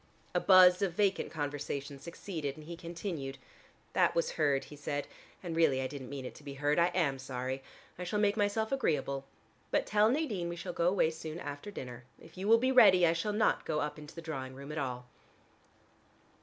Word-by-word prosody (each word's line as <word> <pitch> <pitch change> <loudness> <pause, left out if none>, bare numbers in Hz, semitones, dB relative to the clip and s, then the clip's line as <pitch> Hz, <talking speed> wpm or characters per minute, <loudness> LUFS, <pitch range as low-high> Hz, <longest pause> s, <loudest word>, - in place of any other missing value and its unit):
A - - +3
buzz 185 -1 +7
of 195 -4 +1
vacant 195 +1 +1
conversation 145 -1 -4
succeeded, 160 -2 -5
and 155 - -11
he 170 +2 -6
continued. 165 -5 -5 0.6
"That - - +3
was 170 - +1
heard," 145 -4 +1
he 150 - -11
said, 145 0 -3 0.4
"and 170 -2 -4
really 160 -5 +3
I 130 - -1
didn't 130 -1 -6
mean 140 -2 -6
it - - -6
to - - -15
be 140 -1 -7
heard. 145 +3 +1
I 170 - +5
am 160 -7 0
sorry. 130 0 -4 0.4
I - - -3
shall 210 +4 -2
make 205 -1 +3
myself 220 +1 0
agreeable. 140 - 0 0.4
But - - +1
tell 210 +1 +4
Nadine 230 - -1
we 170 - -4
shall 175 +1 -5
go 170 - +1
away 180 -3 +3
soon 160 0 -7
after 145 +4 -6
dinner. 125 -10 -8 0.2
If - - -16
you 190 +2 -4
will 225 +1 +7
be 255 +3 +2
ready, 185 -8 +7
I 165 - +4
shall 170 +6 -1
not 215 +1 +2
go 155 -1 -1
up 150 0 -3
into 150 0 -11
the 165 - -8
drawing 130 -5 -5
room 140 +2 -8
at 155 - -3
all." 125 -3 -3
160 Hz, 210 wpm, -32 LUFS, 140-185 Hz, 0.6 s, buzz